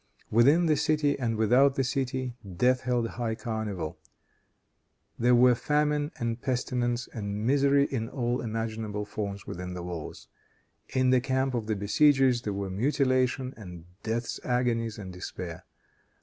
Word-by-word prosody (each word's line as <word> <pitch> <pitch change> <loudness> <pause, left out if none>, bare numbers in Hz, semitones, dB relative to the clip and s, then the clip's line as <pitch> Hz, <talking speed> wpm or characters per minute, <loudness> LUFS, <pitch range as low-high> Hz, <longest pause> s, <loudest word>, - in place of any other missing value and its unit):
Within 140 +10 +5
the 155 -2 +3
city 150 -1 +1
and 115 -3 0
without 125 +6 +4
the 135 - +1
city, 130 -1 -2 0.2
death 125 +4 +3
held 125 -2 0
high 115 -1 -3
carnival. 110 -9 -4 1.2
There 120 +1 +5
were 125 +1 +6
famine 150 +3 +1
and 115 0 -3
pestilence 125 -1 -1
and 105 -1 -4
misery 140 +2 +4
in 115 -5 -3
all 120 -1 -1
imaginable 110 -2 -3
forms 100 -1 -5
within 90 +1 -6
the 90 - -5
walls. 85 -3 -7 0.6
In 130 -1 +2
the 130 -1 +4
camp 130 0 0
of 115 -3 -2
the 110 - 0
besiegers, 130 +4 +3
there 105 - -3
were 100 -1 -3
mutilation, 130 +3 +1
and 90 -6 -10 0.2
death's 115 +2 -3
agonies 120 -3 0
and 95 -3 -7
despair. 90 -2 -7
120 Hz, 145 wpm, -28 LUFS, 110-130 Hz, 1.2 s, were